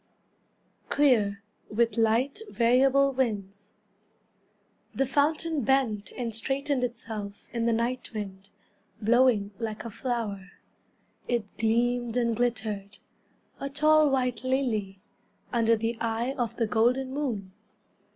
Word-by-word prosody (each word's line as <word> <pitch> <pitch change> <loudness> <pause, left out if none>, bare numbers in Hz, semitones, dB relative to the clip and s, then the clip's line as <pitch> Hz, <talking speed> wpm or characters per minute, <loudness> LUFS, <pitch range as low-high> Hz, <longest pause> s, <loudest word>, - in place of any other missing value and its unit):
Clear, 210 -9 +3 0.3
with 230 +2 +1
Light, 230 - +2
Variable 270 +3 +4
Winds 205 -5 -2 1.2
The 270 - +2
fountain 300 +3 +1
bent 240 -5 +1
and 235 -3 -4
straightened 270 +4 -1
itself 220 -4 -5
In 235 -1 0
the - - +3
night 240 +2 -1
wind, 200 -3 -7 0.5
Blowing 225 -2 +3
like 225 -1 -4
a 230 - -5
flower. 210 -5 -4 0.7
It 235 -5 -2
gleamed 240 +1 +1
and 235 -2 +1
glittered, 215 -4 -2 0.6
A 275 - -3
tall 305 +1 +4
white 250 -3 0
lily, 235 -7 -1 0.6
Under 230 -1 +4
the 225 +1 -2
eye 230 +3 -1
of 240 -4 -2
the 230 - +1
golden 250 +5 +1
moon. 225 -10 -3
235 Hz, 110 wpm, -28 LUFS, 215-260 Hz, 1.2 s, Variable